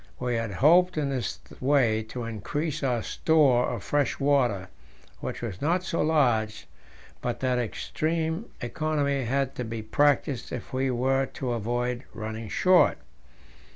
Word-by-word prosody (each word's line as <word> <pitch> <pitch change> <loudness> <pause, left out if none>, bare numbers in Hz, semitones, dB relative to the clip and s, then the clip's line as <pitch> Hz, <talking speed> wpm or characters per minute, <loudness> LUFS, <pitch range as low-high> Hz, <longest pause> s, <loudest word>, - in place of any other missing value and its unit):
We 125 -1 -1
had 115 -1 -1
hoped 175 - +4
in 145 -2 0
this 130 -3 -3 0.2
way 125 -5 +3
to 125 - -5
increase 125 - -3
our 125 -5 0
store 140 -7 +3
of 120 -5 -4
fresh 145 -3 0
water, 125 -9 +2 0.5
which - - -5
was 105 -6 -5
not 175 +5 +1
so 170 - -1
large 120 -9 +1 0.6
but 120 -1 -2
that 125 -1 +1
extreme 160 - -2 0.2
economy 140 0 -1
had 135 +2 0
to 125 - -2
be 110 -1 -5
practised 145 +1 +1
if - - -6
we 130 +1 +1
were 130 +2 +1
to 130 -2 -4
avoid 120 +2 -2
running 110 0 -5
short. 180 - +4
130 Hz, 145 wpm, -27 LUFS, 115-145 Hz, 0.6 s, hoped